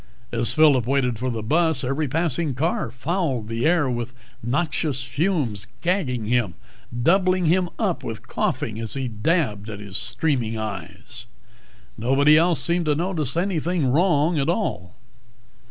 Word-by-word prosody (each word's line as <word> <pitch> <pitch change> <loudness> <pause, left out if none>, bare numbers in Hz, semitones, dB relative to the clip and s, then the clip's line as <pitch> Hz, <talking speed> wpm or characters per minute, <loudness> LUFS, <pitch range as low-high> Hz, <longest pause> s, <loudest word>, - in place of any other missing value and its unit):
As 120 0 0
Phillip 145 -7 +4
waited 125 -4 +1
for 130 +1 -1
the 115 -3 -3
bus, 160 +3 +2
every 135 +4 -1
passing 160 -1 0
car 150 -1 -1
fouled 135 - -2
the 115 +5 0
air 165 -4 +3
with 120 0 -3 0.3
noxious 145 +1 -1
fumes, 135 - -1 0.2
gagging 155 - 0
him, 115 -6 0 0.5
doubling 185 +2 +3
him 175 +2 +2
up 195 -6 -1
with 115 -2 -6
coughing 110 0 -2
as 115 +1 -4
he 135 -2 -2
dabbed 110 - -1
at 105 -2 -6
his 100 -2 -5
streaming 125 -8 -1
eyes. 110 -2 -7 0.7
Nobody 135 +6 +4
else 165 +1 +4
seemed 170 -1 0
to 150 - +3
notice 160 -4 -1
anything 170 -5 0
wrong 160 0 +3
at 140 - 0
all. 90 - -2
140 Hz, 145 wpm, -23 LUFS, 120-170 Hz, 0.7 s, Phillip